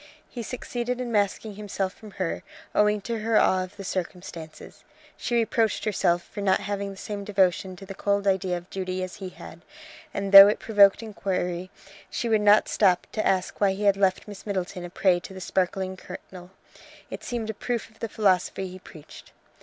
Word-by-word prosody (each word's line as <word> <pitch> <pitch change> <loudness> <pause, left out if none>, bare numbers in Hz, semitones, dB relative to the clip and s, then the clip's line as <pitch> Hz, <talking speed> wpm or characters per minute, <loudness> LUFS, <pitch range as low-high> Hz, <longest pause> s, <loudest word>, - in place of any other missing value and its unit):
He 240 - -7
succeeded 245 +1 -4
in 245 -2 -3
masking 205 0 0
himself 200 -2 -3
from 215 - -13
her, 185 -3 -3 0.3
owing 210 0 +3
to 230 +2 -3
her 220 0 +2
awe 185 0 +3
of 185 +3 -11
the 200 - -7
circumstances. 175 -3 -6 0.3
She 240 - -2
reproached 225 -1 +1
herself 175 -4 +1
for 205 - -8
not 190 -1 +3
having 200 0 -3
the 195 - -9
same 205 0 -5
devotion 190 -2 +1
to 195 +2 -11
the 195 - -7
cold 200 +1 0
idea 190 -2 +1
of 175 +1 -10
duty 185 -1 -3
as 185 - -7
he 190 -2 -6
had; 170 -2 -12 0.5
and 200 -5 -3
though 195 0 +12
it 210 - +2
provoked 205 -1 +4
inquiry, 185 -4 -3 0.4
she 235 - -3
would 220 -1 +3
not 210 +1 +5
stop 185 -4 +3
to 215 - -1
ask 185 +1 0
why 195 -2 +4
he 200 +2 -5
had 200 -1 +5
left 195 0 +1
Miss 205 -2 -9
Middleton 185 -2 -3
a 175 - -6
prey 180 0 +2
to 190 +2 -11
the - - -7
sparkling 190 +1 -1
colonel. 180 -1 -11 0.6
It - - -6
seemed 230 -3 -3
a - - -10
proof 235 +2 -3
of 220 - -25
the 230 - -4
philosophy 190 -2 +1
he 185 +1 -10
preached. 155 -4 -14
195 Hz, 195 wpm, -26 LUFS, 185-210 Hz, 0.6 s, though